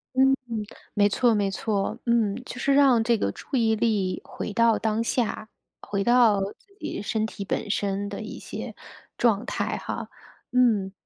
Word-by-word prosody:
嗯， 270 +1 +5 0.6
没 205 -1 +4
错 235 +3 +3
没 205 -2 +1
错， 210 +2 -1
嗯， 230 -4 +2
就 - - -8
是 275 - +2
让 270 -4 +5
这 235 0 +2
个 100 - 0
注 270 - -6
意 225 -3 +3
力 210 -5 0
回 - - -5
到 230 0 +4
当 220 0 0
下， 230 -2 -1 0.3
回 200 -1 -2
到 235 -3 +5
自 210 - -7
己 - - -4
身 215 +1 -1
体 205 -2 -6
本 205 - -2
身 200 0 -1
的 205 - -6
一 215 - -7
些， - - -7 0.4
状 230 -1 +2
态 - - -2
哈。 - - -5 0.4
嗯， 225 -6 +3
220 Hz, 180 characters per minute, -25 LUFS, 205-240 Hz, 0.6 s, 嗯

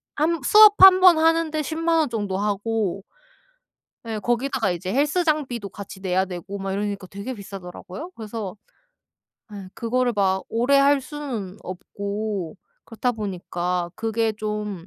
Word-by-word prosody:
1 320 0 0
수업 425 +3 +8
1 375 0 +9
번 360 -4 +7
하는데 325 -1 +2
100,000 330 +2 0
원 300 -5 +1
정도 205 -4 -2
하고 205 -1 -1 1.0
예. 220 -1 -3
거기다가 240 -1 0
이제 175 +2 -3
헬스장비도 290 - 0
같이 195 -1 -10
내야 190 0 +1
되고 190 +2 -7
막 195 0 -4
이러니까 200 -1 -3
되게 200 +7 -6
비싸더라고요. 195 - -9
그래서 215 -3 -6 1.0
예. 195 -2 -8
그거를 245 +1 0
막 190 -1 +1
오래 245 +5 +2
할 280 0 +4
수는 250 -10 -6
없고 200 0 -4 0.3
그렇다 245 +2 -2
보니까 180 -4 -3
그게 225 0 -1
좀 210 -4 -5
215 Hz, 265 characters per minute, -23 LUFS, 195-275 Hz, 1.0 s, 1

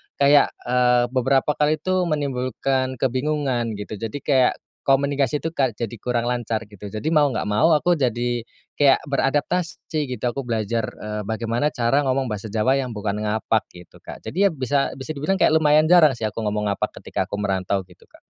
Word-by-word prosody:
kayak, 140 0 +5 0.2
eee, 125 0 +3
beberapa 135 +3 +2
kali 150 +1 +3
itu 185 +2 -1
menimbulkan 130 -2 -1
kebingungan, 130 -2 -1
gitu. 105 0 -7
Jadi 115 +5 -5
kayak 130 -3 +3 0.3
komunikasi, 140 +1 +1
tuh, 165 - -2
Kak, 130 -8 0
jadi 115 0 -4
kurang 120 -1 -1
lancar, 115 -2 -2
gitu. 105 -1 -11
Jadi 110 +8 -5
mau 150 -2 +4
nggak 135 - -2
mau 155 +11 +4
aku 175 +2 +2
jadi 120 -2 0 0.4
kayak 140 -2 +5
beradaptasi, 150 +2 -1
gitu. - - -15
Aku 135 0 -6
belajar, 115 0 -1
eee, 105 0 -5
bagaimana 115 +5 -1
cara 125 +4 +2
ngomong 130 -2 0
bahasa 105 +1 -4
Jawa 115 +6 +1
yang 125 -4 -4
bukan 105 0 -2
ngapak, 110 +1 0
gitu, 90 -1 -15
Kak. - - -11
Jadi, 200 +3 +2
ya, - - +1
bisa 135 -1 -1
bisa 135 +3 -6
dibilang 155 +6 -1
kayak - - +4
lumayan 155 0 +4
jarang, 155 -7 +6
sih, 115 - -8
aku 110 - -6
ngomong 105 -1 -1
ngapak 100 - -4
ketika - - -2
aku - - -4
merantau, 95 -1 -1
gitu, 90 -1 -21
Kak. - - -21
130 Hz, 185 wpm, -22 LUFS, 110-145 Hz, 0.4 s, jarang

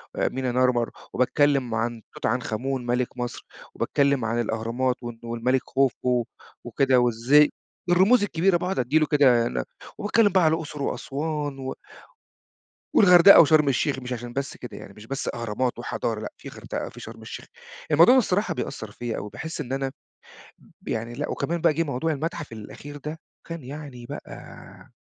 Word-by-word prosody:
آآ، - - +1
مينا 130 -1 -2
نارمر، 125 -1 +2 0.2
وباتكلَّم 130 -2 +2
عن 115 0 -2
توت - - -6
عنخ 125 0 -1
آمون 130 +2 -2
مَلِك 125 +1 -1
مصر، 120 -1 -5 0.3
وباتكلَّم 140 -4 +1
عن 115 +1 -1
الأهرامات، 115 +3 -1
وإنه 120 -1 -7
والملك 120 +2 0
خوفو 125 -2 +1 0.4
وكده 130 +2 +2
وإزاي 125 +5 +4 0.4
الرموز 195 +6 +5
الكبيرة، 185 -1 +2
باقعُد 180 0 -2
أدِّي 130 +6 +2
له 155 - +3
كده 130 -5 +4
نب - - -3 0.3
وباتكلَّم 210 +1 +3
بقى 185 -2 +4
على 160 -1 +4
الأقصر، 155 -3 -4
وأسوان، 145 0 -3
و 130 0 -4 1.2
والغردقة 180 0 +8
وشرم 155 -1 +4
الشيخ، 135 +1 0
مش 125 0 -5
عشان 120 0 -6
بس 140 +1 -4
كده، 125 - -9
يعني 100 - -11
مش 105 +2 -13
بس 135 +3 -3
أهرامات 120 +2 -2
وحضارة، 115 -2 -3
لأ، - - -6
في - - -10
غردقة، - - -6
في - - -13
شرم - - -10
الشيخ. - - -8 0.5
الموضوع 170 - +7
ده 260 - +6
الصراحة 200 -3 0
بيأثِّر 110 -8 -5
فيّا 120 +1 -4
أوي، 105 - -5
باحِس 160 0 -5
إن 130 -2 -5
أنا 135 0 -2 1.0
يعني 115 +2 -3
لأ، 145 +4 -4
وكمان 170 0 -2
بقى 165 -2 +4
جِه 165 +3 +1
موضوع 150 +1 -1
المتحف 150 -1 -4
الأخير 125 +6 -9
ده، 150 +3 -7 0.3
وكان 165 -4 -7
يعني 135 -3 -8
بقى - - -11
135 Hz, 170 wpm, -25 LUFS, 120-155 Hz, 1.2 s, والغردقة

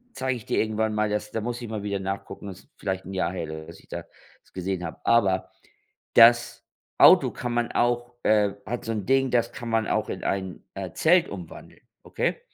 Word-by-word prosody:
zeige 130 -1 -1
ich 110 - -10
dir - - 0
irgendwann 110 0 0
mal. 105 0 +1
Das 105 0 -2
da 115 - -2
muss 120 +2 -4
ich 115 - -6
mal 110 -2 -4
wieder 100 -1 -2
nachgucken, 95 +1 -5
das 95 +6 -11
vielleicht 95 -1 -3
'n 95 - -6
Jahr 95 -1 0
her, 80 -3 -5
dass - - -12
ich - - -24
das - - -6 0.5
gesehen 95 -1 -3
habe. 80 - -6
Aber 100 -5 +2 0.6
das 120 +1 +6 0.3
Auto - - +7
kann 120 - -4
man 120 0 -1
auch 120 0 0
äh, 105 -2 +3
hat 120 +2 -4
so 115 - -2
'n 105 -3 -4
Ding, 135 0 +3
das 120 -1 +1
kann 120 - -7
man 115 -1 +1
auch - - 0
in - - -5
ein, 95 -2 -3
äh, 95 -3 -6
Zelt 175 +2 +4
umwandeln. 90 -4 -10 0.2
Okay? - - -2
105 Hz, 205 wpm, -25 LUFS, 95-120 Hz, 0.6 s, Auto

